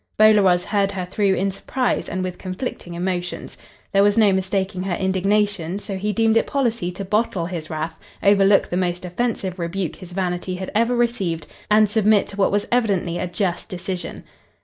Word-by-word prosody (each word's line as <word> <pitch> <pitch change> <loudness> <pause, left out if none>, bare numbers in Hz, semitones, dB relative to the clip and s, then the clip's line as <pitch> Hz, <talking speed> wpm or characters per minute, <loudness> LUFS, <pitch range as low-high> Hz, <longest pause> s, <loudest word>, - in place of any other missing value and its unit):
Bolaroz 205 -5 +5
heard 200 -1 +1
her 185 -2 -3
through 195 +1 +1
in 195 +2 0
surprise 250 +6 -1
and 185 +1 -2
with 180 -1 -5
conflicting 185 -2 -5
emotions. 175 0 -3 0.4
There 195 - +4
was 205 +1 +3
no 210 -3 +5
mistaking 190 0 -1
her 185 -2 -1
indignation, 190 -1 0
so 205 -1 -6
he 205 +3 -1
deemed 225 +1 +3
it - - +2
policy 235 -10 0
to 195 +2 -6
bottle 205 -3 0
his 170 -3 -5
wrath, 160 +1 -4 0.2
overlook 200 0 +5
the 175 - -1
most 180 -1 -1
offensive 190 -1 -2
rebuke 175 0 -3
his 185 -2 -10
vanity 180 0 -2
had 185 +1 -5
ever 230 +3 +2
received, 195 -10 0 0.2
and 215 0 +5
submit 215 0 +3
to - - -8
what 200 -1 +2
was 205 +1 +1
evidently 195 -8 +1
a - - -2
just 180 +1 -2
decision. 185 -2 -5
195 Hz, 180 wpm, -22 LUFS, 180-210 Hz, 0.4 s, Bolaroz